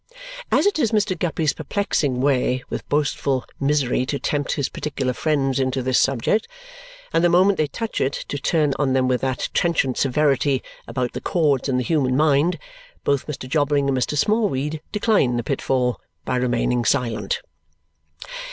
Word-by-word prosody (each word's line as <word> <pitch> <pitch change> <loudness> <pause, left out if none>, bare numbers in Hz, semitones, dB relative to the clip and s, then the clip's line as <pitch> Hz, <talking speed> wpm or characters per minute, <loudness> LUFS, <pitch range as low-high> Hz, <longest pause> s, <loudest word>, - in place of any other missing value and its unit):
As - - +3
it 405 -5 +2
is 235 -7 +2
Mr. 210 -3 +1
Guppy's 160 -3 0
perplexing 155 -6 -1
way 130 -2 +1
with - - -5
boastful 145 -3 0
misery 140 -3 +1
to 140 - -1
tempt 145 0 -1
his 140 - -1
particular 135 -4 -3
friends 135 -2 0
into 130 0 0
this 130 0 +2
subject, 135 - +1 0.7
and 165 - +3
the 175 - +5
moment 185 +3 +4
they 155 - +2
touch 225 +9 -4
it, 135 +1 +1
to 145 - -4
turn 150 -2 +1
on 140 -3 +1
them 130 -1 +2
with 125 -1 +1
that 130 -1 -2
trenchant 150 -7 +1
severity 140 -1 +2 0.2
about 125 -2 -2
the - - -5
chords 145 -6 +1
in 130 - +1
the 125 - 0
human 130 -4 +1
mind, 150 +3 +3 0.5
both 140 -2 0
Mr. 140 -4 -6
Jobling 145 0 +1
and 135 - +1
Mr. 130 +3 -1
Smallweed 155 - 0
decline 205 - +2
the 120 - -1
pitfall 125 -3 -1 0.2
by - - -1
remaining 125 -1 +1
silent. 115 -6 0
140 Hz, 165 wpm, -22 LUFS, 130-155 Hz, 0.7 s, the